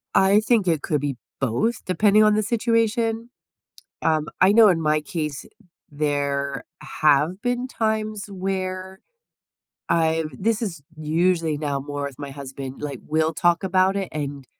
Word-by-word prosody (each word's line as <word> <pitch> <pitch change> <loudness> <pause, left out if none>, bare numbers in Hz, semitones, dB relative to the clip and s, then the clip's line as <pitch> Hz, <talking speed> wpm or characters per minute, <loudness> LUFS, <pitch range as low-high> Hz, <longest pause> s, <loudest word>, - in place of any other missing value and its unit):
I 195 +2 +5
think 220 -3 +2
it 160 -4 +2
could 150 -2 -1
be 145 -2 -2 0.2
both 135 - 0
depending 210 +3 +4
on 210 0 +4
the 215 - +1
situation. 230 +1 0 0.7
Um, 155 -1 +1
I 185 +2 +6
know 220 0 +7
in 175 -4 +2
my 155 -1 +2
case, 150 -4 -4 0.5
there 140 -2 -1 0.4
have 155 +5 +3
been 245 0 -1
times 215 -3 -2
where 190 0 -4 0.9
I've 160 -1 +1
this 220 +2 0
is 170 -9 -4
usually 160 0 +1
now 145 -2 -2
more 145 +1 -5
with 140 -2 -6
my 140 -1 -6
husband, 135 0 -8
like, 140 -4 -5
we'll 160 +1 +1
talk 175 +2 +2
about 190 +1 +2
it, 195 -2 -2
and 140 -3 -5
170 Hz, 150 wpm, -23 LUFS, 145-210 Hz, 0.9 s, know